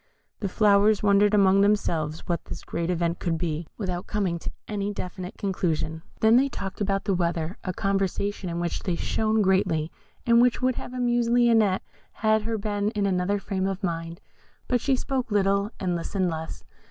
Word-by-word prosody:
The 200 - -2
flowers 210 +1 +4
wondered 205 +1 +4
among 195 -1 +5
themselves 165 -7 +1
what 170 -1 -2
this - - -8
great 170 0 -3
event 170 -1 0
could 165 -2 -1
be, 160 -1 -3
without 180 -4 -3
coming 190 -5 -1
to - - -5 0.2
any 205 -1 -2
definite 185 -1 -6
conclusion. 165 -5 -2 0.2
They 220 - +5
then 260 +4 +5
talked 195 -5 -6
about 195 0 0
the 195 - +1
weather, 170 0 -1
a 185 - -2
conversation 195 0 -1
in 170 0 -3
which 175 0 -2
they 180 - -1
shone 220 +4 +1
greatly, 170 -5 +1 0.3
and 235 0 +5
which 245 -1 +3
would 255 0 +2
have 245 - -7
amused 240 -1 +1
Lionette 230 -5 +3 0.3
had 215 0 +1
she 225 0 -1
been 205 0 -1
in 205 -1 +1
another 190 +1 +1
frame 195 -1 -2
of 195 +1 -4
mind, 165 -1 -3 0.5
but 245 -2 +1
she 275 - +2
spoke 260 -1 -2
little, 200 0 +2
and 180 -2 -1
listened 180 +1 -1
less. 160 0 -6
195 Hz, 180 wpm, -26 LUFS, 175-210 Hz, 0.5 s, among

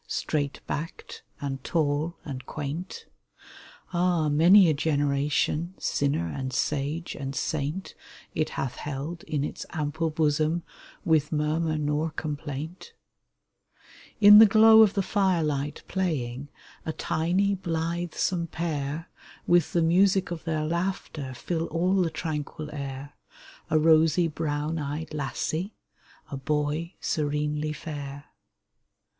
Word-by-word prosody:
Straight 145 -2 -2
backed 165 +3 -6 0.2
and 135 -2 -4
tall 155 +1 0
and 130 -3 -6
quaint; 150 +5 -5 0.9
Ah! 175 -3 +2
many 175 +6 +7
a 160 - +4
generation 145 +3 0
— - - -34
Sinner 140 -12 0
and 130 +10 -4
sage 150 +5 -1
and 135 0 -5
saint 155 +5 -2 0.2
— - - -21
It 155 - 0
hath 125 -2 -3
held 150 +4 -5
in 145 -2 -1
its - - -4
ample 160 +1 -2
bosom 155 +2 +1 0.4
With 155 -2 +2
murmur 155 +1 0
nor 150 +2 0
complaint! 155 - -6 1.3
EVENTIDE - - -35
183 205 - +7
In 205 +1 +11
the 220 - +10
glow 220 0 +8
of 215 -2 +5
the 195 - +1
fire 190 -4 +2
light 145 -1 -2
playing, 145 -8 -2 0.3
A 160 - -3
tiny, 185 +7 +1
blithesome 170 0 -2
pair, 155 -1 -3 0.4
With 175 -3 +3
the 170 - +2
music 185 +3 +3
of 165 -2 -5
their 155 -2 -1
laughter 165 -5 -3
Fill 165 +5 -2
all 180 +3 +1
the 170 - +1
tranquil 155 -2 -4
air 140 0 -6 0.3
— - - -21
A 155 - +3
rosy, 160 +2 +4
brown 155 0 -2
eyed 150 +2 -4
lassie, 155 +6 -3 0.6
A 140 - -3
boy 150 +4 -1
serenely 150 0 -1
fair. 145 -3 -7
155 Hz, 130 wpm, -27 LUFS, 145-170 Hz, 1.3 s, In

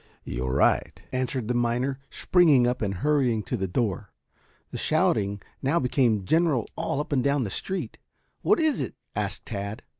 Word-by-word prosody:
"You're 65 +1 -3
right," 70 - +2
answered 130 -2 -2
the 125 - 0
miner, 120 +3 0
springing 155 -9 +4
up 125 +1 0
and 105 -3 0
hurrying 125 +1 +1
to 125 - -3
the 95 -4 -2
door. 95 +1 -2 0.6
The - - -5
shouting 100 -1 +1 0.2
now 145 +6 +2
became 120 -6 +1
general 160 - +2
all 140 - -2
up 150 - -4
and 130 -3 +2
down 140 -1 +2
the 100 - -4
street. 190 - -4 0.4
"What 420 - +3
is 315 -3 +2
it?" - - -4 0.2
asked 100 -1 -3
Tad. 100 0 -5
125 Hz, 170 wpm, -26 LUFS, 100-140 Hz, 0.6 s, springing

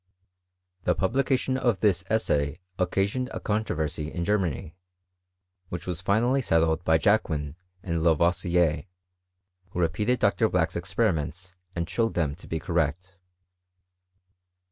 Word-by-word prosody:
— 90 0 -42
^The - - +3
publication 130 +5 +1
of 120 -7 +1
this 95 -4 +3
essay 75 -9 +1 0.2
occasioned 100 +8 0
a - - -4
controversy 80 -8 -2
in 85 -1 -3
Germany, 85 -5 -1 0.9
which 85 - -5
was 90 -2 -3
finally 120 +8 +2
settled 80 -5 +2
by 80 -1 +4
Jacquin 80 -7 +1 0.3
and 85 -2 -1
Lavoisier, 85 0 +2 0.8
who 90 - -5
repeated 105 +9 +1
Dr. 110 +1 +2
Black's 85 -3 +1
experiments 90 -2 -1 0.2
and 85 -1 -2
showed 115 +3 0
them 80 -5 +1
to - - -13
be 80 - -2
correct. 85 +2 -2
90 Hz, 120 wpm, -27 LUFS, 80-105 Hz, 0.9 s, by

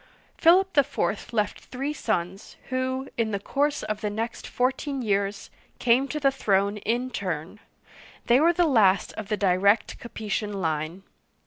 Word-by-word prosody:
Philip 375 +3 +4
IV. 215 -9 0
left 210 -3 -1
three 275 +4 -4
sons, 190 - -3
who, 260 +1 -2
in 225 -1 +1
the 200 -2 -2
course 285 +7 -1
of 215 -1 -3
the 210 - -1
next 225 +3 -4
fourteen 265 +2 -1
years, 200 -1 -1 0.3
came 255 +3 +3
to 300 - -3
the 275 -2 +3
throne 200 -5 +1
in 240 +5 -1
turn; 185 -2 -4 0.7
they 240 +2 +5
were 330 +3 +5
the 345 0 +2
last 210 - +3
of 215 - -6
the 210 0 -1
direct 200 +2 +2
Capetian 215 -2 -4
line. 160 0 -2
220 Hz, 150 wpm, -26 LUFS, 200-265 Hz, 0.7 s, they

